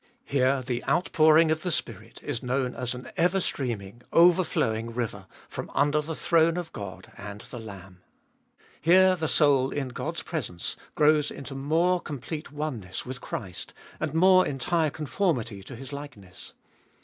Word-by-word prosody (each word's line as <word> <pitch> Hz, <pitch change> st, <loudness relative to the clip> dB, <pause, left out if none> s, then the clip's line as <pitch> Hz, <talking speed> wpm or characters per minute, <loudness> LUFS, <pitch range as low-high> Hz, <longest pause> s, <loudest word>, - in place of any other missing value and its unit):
Here 135 Hz, -1 st, +2 dB
the 120 Hz, -1 st, -3 dB
outpouring 160 Hz, -2 st, +4 dB
of 155 Hz, 0 st, 0 dB
the 180 Hz, -, -2 dB
Spirit 115 Hz, -, -4 dB
is 120 Hz, -, -3 dB
known 125 Hz, 0 st, -1 dB
as 125 Hz, 0 st, -3 dB
an 125 Hz, -, -9 dB
ever 180 Hz, +3 st, +3 dB
streaming, 120 Hz, -, -3 dB
overflowing 165 Hz, -10 st, +3 dB
river, 105 Hz, -5 st, -3 dB, 0.2 s
from -, -, -6 dB
under 145 Hz, +1 st, +3 dB
the 160 Hz, +2 st, -5 dB
throne 165 Hz, +1 st, +3 dB
of 175 Hz, -2 st, -5 dB
God 95 Hz, -3 st, -8 dB
and 100 Hz, 0 st, -8 dB
the 120 Hz, -, -9 dB
Lamb. 100 Hz, -4 st, -11 dB, 0.8 s
Here 185 Hz, +3 st, +6 dB
the 160 Hz, -3 st, -2 dB
soul, 140 Hz, -4 st, +4 dB
in 140 Hz, -2 st, -3 dB
God's 125 Hz, -, -4 dB
presence, 85 Hz, -1 st, -4 dB, 0.2 s
grows 150 Hz, 0 st, +4 dB
into 140 Hz, 0 st, -8 dB
more 165 Hz, +6 st, +1 dB
complete 150 Hz, +2 st, -6 dB
oneness 130 Hz, -11 st, -4 dB
with 130 Hz, +1 st, -7 dB
Christ, 95 Hz, -5 st, -6 dB, 0.2 s
and 155 Hz, -1 st, -1 dB
more 185 Hz, +2 st, +6 dB
entire 155 Hz, +4 st, 0 dB
conformity 140 Hz, -, -1 dB
to 110 Hz, +6 st, -10 dB
His 135 Hz, +4 st, -9 dB
likeness. 110 Hz, -11 st, -10 dB
140 Hz, 150 wpm, -27 LUFS, 115-160 Hz, 0.8 s, Here